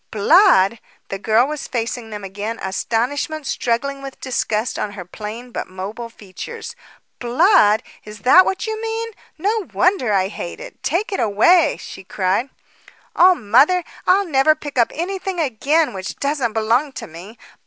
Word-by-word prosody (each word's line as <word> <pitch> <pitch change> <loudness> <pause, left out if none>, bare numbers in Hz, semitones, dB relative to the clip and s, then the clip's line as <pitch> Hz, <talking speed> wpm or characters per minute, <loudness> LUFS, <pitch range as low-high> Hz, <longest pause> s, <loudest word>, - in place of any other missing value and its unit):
"Blood!" 230 - +4 0.3
The 195 - -4
girl 220 +4 +3
was 300 +1 -5
facing 235 -1 -4
them 210 -2 -7
again, 205 +4 -5
astonishment 250 +10 -2
struggling 270 +3 -2
with 275 -1 -9
disgust 240 -3 -2
on 205 - -3
her 180 -3 -8
plain 220 +6 -8
but - - -5
mobile 200 +6 -6
features. 220 - -9 0.4
"Blood! 245 - +4 0.2
is 210 -1 -11
that 310 - +7
what 380 - -2
you 440 0 -4
mean. 455 0 -3 0.3
No 415 +4 -1
wonder 365 - +2
I 190 -2 +2
hate 175 -4 -7
it. - - -11
Take 395 +6 -1
it 390 - -2
away," 235 - +4
she 190 - -10
cried. 190 +7 -1 0.7
"Oh, 365 +1 +6
mother, 285 - +3 0.2
I'll 390 +2 +4
never 310 -1 +3
pick 295 -2 -9
up 235 - +3
anything 375 +2 -4
again 295 +2 +1
which 190 -1 -6
doesn't 280 -5 -1
belong 235 +6 +1
to - - -7
me! 180 +8 -12
245 Hz, 155 wpm, -20 LUFS, 210-335 Hz, 0.7 s, that